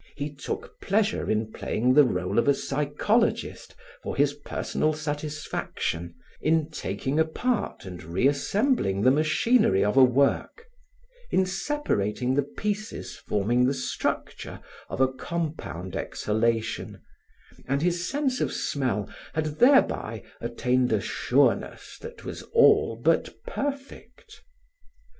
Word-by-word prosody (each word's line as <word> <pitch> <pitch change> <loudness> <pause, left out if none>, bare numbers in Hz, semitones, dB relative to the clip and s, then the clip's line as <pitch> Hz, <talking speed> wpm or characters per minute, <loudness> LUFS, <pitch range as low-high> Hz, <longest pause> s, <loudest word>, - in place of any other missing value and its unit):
He 145 +1 -4
took 140 - -6
pleasure 215 +2 +1
in 110 0 0
playing 125 +3 +1
the 150 +2 +8
role 90 -4 0
of - - +1
a 140 - +5
psychologist 150 - 0 0.3
for - - -4
his - - +3
personal 155 - -2
satisfaction, 150 - -4 0.3
in 160 0 +1
taking 130 +3 -2
apart 205 - -1
and 90 -2 -8
re 85 +9 -1
assembling 145 - +1
the 130 - +6
machinery 155 - +3
of 105 +5 0
a 135 - +9
work, 140 - +2 0.6
in 190 - +3
separating 155 - -1
the 145 - +3
pieces 210 +9 -4
forming 120 +5 +1
the 135 - +1
structure 130 - -3 0.3
of - - -3
a 130 - +6
compound 130 - -5
exhalation, 115 +1 -1 0.7
and 140 +3 0
his 175 0 0
sense 275 -2 0
of - - 0
smell 125 -8 -1 0.3
had 155 -1 -2
thereby 270 +3 +3 0.2
attained 125 0 0
a 110 - +3
sureness - - 0
that - - -10
was - - -6
all 115 - +5
but 160 +7 +2 0.2
perfect. 280 - -6
145 Hz, 120 wpm, -26 LUFS, 115-185 Hz, 0.7 s, a